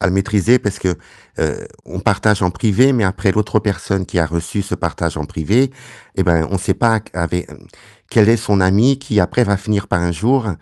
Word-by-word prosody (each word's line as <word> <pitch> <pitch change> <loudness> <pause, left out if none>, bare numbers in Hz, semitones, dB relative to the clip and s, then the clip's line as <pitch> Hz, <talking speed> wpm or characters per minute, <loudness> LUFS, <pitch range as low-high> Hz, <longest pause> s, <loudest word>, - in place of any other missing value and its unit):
à 100 - +1
le 90 - 0
maîtriser 105 +5 +2
parce 105 -3 -3
que, 90 -2 -1 0.4
heu, - - -2 0.2
on - - -7
partage 105 -2 +1
en 90 - +2
privé, 115 +8 +3
mais 115 -4 +1
après 95 +1 +1
l'autre 105 +1 +1
personne 100 -2 -2
qui 90 - -2
a 85 - +2
reçu 85 +5 -3
ce - - -4
partage - - -3
en 75 - -4
privé, 110 - 0 0.4
eh - - +1
ben, 85 -2 +2
on 95 - -1
sait 95 - 0
pas 115 -2 +2
q - - -18
avé 90 0 -2
mmh, - - -14 0.6
quel 110 -1 +4
est 115 - +4
son 105 -3 0
ami, 105 +9 +3
qui 115 -7 0
après 125 +7 +2
va 100 -3 +1
finir 100 0 -2
par 85 - 0
un 85 - 0
jour, 115 +8 +1
100 Hz, 225 wpm, -17 LUFS, 90-110 Hz, 0.6 s, quel